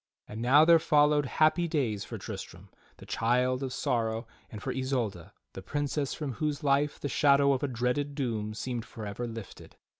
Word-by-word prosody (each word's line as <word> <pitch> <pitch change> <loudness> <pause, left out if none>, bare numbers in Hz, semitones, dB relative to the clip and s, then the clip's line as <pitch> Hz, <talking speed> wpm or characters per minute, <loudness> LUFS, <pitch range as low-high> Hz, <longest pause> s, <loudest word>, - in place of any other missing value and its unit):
And 110 +2 -7
now 140 +6 +6
there 165 0 +7
followed 150 -2 +3
happy 155 +5 +2
days 125 - -1
for - - -7
Tristram, - - -8 0.3
the - - -13
child 125 +3 +1
of 135 -2 -3
sorrow, 115 -2 -1 0.2
and 105 - -8
for - - -3
Isolda 125 -10 -2 0.2
the - - -7
princess 145 -1 -2
from 150 -4 -4
whose 150 +4 -2
life 145 +1 +1
the - - -3
shadow 140 0 +4
of 130 - -2
a 145 - 0
dreaded 130 +3 -1
doom 110 -6 -2
seemed 120 0 -4
forever 110 +2 -6
lifted. 115 -4 -9
130 Hz, 175 wpm, -29 LUFS, 115-145 Hz, 0.3 s, there